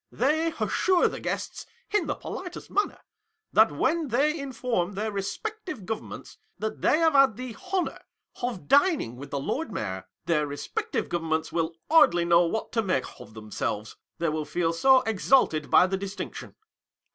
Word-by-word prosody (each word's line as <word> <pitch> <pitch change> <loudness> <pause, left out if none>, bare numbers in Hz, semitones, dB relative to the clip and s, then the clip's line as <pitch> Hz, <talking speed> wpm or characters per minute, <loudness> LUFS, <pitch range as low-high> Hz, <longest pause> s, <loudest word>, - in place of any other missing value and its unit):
They 315 +6 +1
assure 370 -2 +3
the - - -5
guests, - - -4 0.2
in 415 -5 +1
the - - -1
politest 360 -1 -7
manner, 410 - 0 0.5
that - - +6
when 330 -2 0
they 280 +6 +2
inform 245 -8 -2
their 215 +3 -2
respective 305 - -5
governments 220 +1 -6 0.2
that 220 0 -4
they - - +4
have 325 -1 +3
had 275 -6 +5
the 250 -3 -6 0.2
honour 375 -2 -1 0.4
of 235 -11 -3
dining 285 - +3
with 140 +3 -9
the 140 - -2
Lord 275 - -3
Mayor, 95 - -4 0.2
their 150 -3 +1
respective 435 - -3
govern 165 -2 -3
ments 160 0 0
will 165 0 -1
hardly 290 - +5
know 170 0 +5
what 220 +6 -3
to 225 - +1
make 185 -11 0
of 110 - -13
themselves, 105 0 -4 0.2
they 170 - 0
will 155 0 -2
feel 165 +2 -1
so 260 +9 +5
exalted 215 - +2
by - - +7
the 190 +1 -1
distinction. 200 +1 -6
215 Hz, 165 wpm, -27 LUFS, -, 0.5 s, by